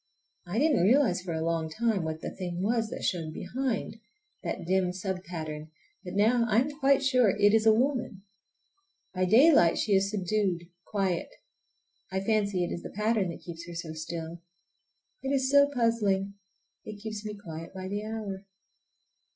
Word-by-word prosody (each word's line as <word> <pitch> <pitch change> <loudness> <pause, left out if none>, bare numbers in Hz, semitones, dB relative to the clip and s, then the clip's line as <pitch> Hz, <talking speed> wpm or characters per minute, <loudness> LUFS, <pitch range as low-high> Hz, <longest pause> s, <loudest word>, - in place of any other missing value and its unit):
I 180 +5 -3
didn't 295 - +3
realize 215 -2 +4
for 175 -3 -4
a 160 0 -2
long 165 -1 -1
time 220 +3 0
what 160 0 -4
the - - -4
thing 180 -1 -4
was 225 +1 +1
that - - -6
showed 165 -4 -1
behind,—that 225 - -5
dim 185 0 +1
sub 185 0 -4
pattern,—but 160 +2 -8
now 230 +3 +3
I 215 +1 +4
am 285 +3 -1
quite 275 0 +4
sure 255 -5 +4
it 205 +1 +3
is 225 0 +4
a - - +9
woman. 240 -4 0 0.9
By 185 0 +1
daylight 220 - +6
she 210 - +1
is 195 0 +3
subdued, 195 -3 0 0.2
quiet. 190 -4 -1 0.8
I 190 - 0
fancy 200 -2 +1
it 175 - -3
is 175 - -4
the - - -7
pattern 210 -2 0
that 170 - -8
keeps 170 0 -8
her 175 - -8
so 165 -1 -5
still. 165 +1 -6 0.8
It 270 - -3
is 265 -1 +1
so 285 0 +6
puzzling. 210 -6 +1 0.5
It 215 - -7
keeps 215 0 -6
me 210 -1 -5
quiet 165 -5 -8
by 185 0 -5
the 205 +2 -3
hour. 210 -3 -5
200 Hz, 165 wpm, -29 LUFS, 175-225 Hz, 0.9 s, a